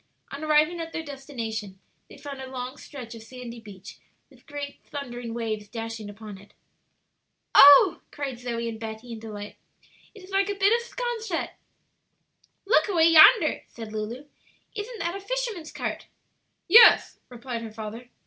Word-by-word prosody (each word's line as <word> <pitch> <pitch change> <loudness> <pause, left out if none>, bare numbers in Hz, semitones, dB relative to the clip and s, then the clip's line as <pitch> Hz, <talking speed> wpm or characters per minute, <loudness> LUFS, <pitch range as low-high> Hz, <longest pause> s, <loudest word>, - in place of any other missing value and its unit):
On 300 - -7
arriving 310 +3 +3
at 330 0 -6
their 325 - -4
destination, 230 -9 -6 0.3
they - - -13
found 280 -2 -8
a 260 - -8
long 255 0 -6
stretch 250 -5 -10
of 230 - -10
sandy 240 0 -10
beach, 205 -4 -12 0.3
with - - -22
great 290 -2 -7
thundering 245 -4 -7
waves 215 -3 -4
dashing 225 -1 -6
upon 205 -1 -10
it. 200 - -19 1.0
"Oh," 285 0 +8
cried 270 -4 -5
Zoe 235 -1 -4
and 225 -1 -6
Betty, 225 +1 -7
in 225 - -7
delight, 210 -2 -9 0.6
"it 405 - -13
is 370 - -14
like 390 +1 +1
a 405 - -2
bit 400 +2 +3
of 470 0 -1
'Sconset!" 475 -2 -3 1.1
"Look 445 +5 +3
away 335 -5 +4
yonder," 325 +2 +7
said 225 -2 -10
Lulu; 220 +6 -5 0.5
"isn't 455 +2 -6
that 340 +2 -2
a - - -5
fisherman's 430 -6 -4
cart?" - - -5 0.6
"Yes," 455 +6 +7
replied 240 -1 -6
her 225 -1 -7
father. 220 +3 -8
255 Hz, 160 wpm, -26 LUFS, 225-330 Hz, 1.1 s, Oh